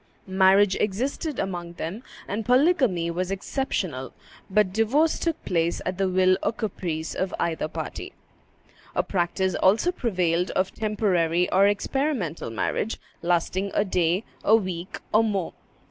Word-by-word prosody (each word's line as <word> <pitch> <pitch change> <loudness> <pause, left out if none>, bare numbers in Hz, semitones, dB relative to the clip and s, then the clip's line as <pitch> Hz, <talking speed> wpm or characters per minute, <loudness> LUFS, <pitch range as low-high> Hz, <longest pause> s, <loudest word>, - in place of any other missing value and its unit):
Marriage 190 +1 +4
existed 260 - -2
among 175 -3 -3
them, 175 +6 -5 0.3
and 210 +3 -2
polygamy 250 - +3
was 180 +2 -2
exceptional; 190 - -3 0.4
but 190 -1 +2
divorce 265 +10 +2
took 330 -2 -2
place 170 -2 0
at 185 +1 -3
the 195 -1 +2
will 185 0 +4
or 205 - +1
caprice 175 -8 -4
of 190 -1 -2
either 160 -2 -1
party. - - -6 0.8
A - - +2
practice 185 +1 0
also 215 - +3
prevailed 180 - 0
of 185 0 0
temporary 180 -6 +1
or 195 +2 +5
experimental 205 - -1
marriage, 160 - -2 0.2
lasting 175 +3 0
a 205 - +3
day, 180 +1 +1 0.2
a 220 - +6
week, 185 -4 -3
or 215 +1 +5
more. 200 -6 -1
190 Hz, 135 wpm, -25 LUFS, 175-220 Hz, 0.8 s, a